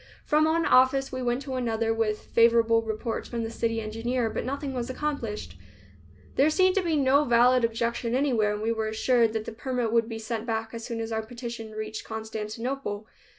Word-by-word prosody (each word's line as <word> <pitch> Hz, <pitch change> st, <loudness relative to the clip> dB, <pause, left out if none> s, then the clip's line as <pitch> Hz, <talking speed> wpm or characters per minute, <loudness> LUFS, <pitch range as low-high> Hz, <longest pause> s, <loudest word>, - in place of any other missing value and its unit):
From 305 Hz, +1 st, +3 dB
one 325 Hz, +1 st, +2 dB
office 260 Hz, +2 st, +4 dB
we 255 Hz, 0 st, -4 dB
went 245 Hz, +2 st, -1 dB
to 265 Hz, -1 st, -5 dB
another, 230 Hz, -3 st, 0 dB
with 220 Hz, -1 st, -1 dB
favorable 230 Hz, -1 st, +5 dB
reports 225 Hz, +1 st, -4 dB
from 235 Hz, -1 st, -3 dB
the 225 Hz, -, -4 dB
city 230 Hz, 0 st, -1 dB
engineer, 225 Hz, +2 st, -2 dB
but -, -, -3 dB
nothing 275 Hz, +1 st, -3 dB
was 245 Hz, -1 st, -3 dB
accomplished. 260 Hz, -6 st, -4 dB, 0.8 s
There 280 Hz, +3 st, +5 dB
seemed 370 Hz, +3 st, +4 dB
to -, -, +4 dB
be 335 Hz, -3 st, 0 dB
no 280 Hz, 0 st, +4 dB
valid 245 Hz, -1 st, +4 dB
objection 230 Hz, +1 st, 0 dB
anywhere, 240 Hz, -7 st, +2 dB
and 210 Hz, +1 st, -4 dB
we 225 Hz, -, +1 dB
were 220 Hz, -1 st, -1 dB
assured 230 Hz, +1 st, +2 dB
that 220 Hz, -1 st, -2 dB
the -, -, -5 dB
permit 245 Hz, 0 st, -2 dB
would 230 Hz, 0 st, +2 dB
be 225 Hz, -, -4 dB
sent 225 Hz, +1 st, -4 dB
back 225 Hz, 0 st, -2 dB
as 230 Hz, 0 st, -6 dB
soon 230 Hz, -1 st, -4 dB
as 225 Hz, 0 st, -4 dB
our 220 Hz, 0 st, 0 dB
petition 235 Hz, -1 st, -7 dB
reached 215 Hz, 0 st, -5 dB
Constantinople. 220 Hz, +1 st, -4 dB
230 Hz, 195 wpm, -27 LUFS, 225-255 Hz, 0.8 s, favorable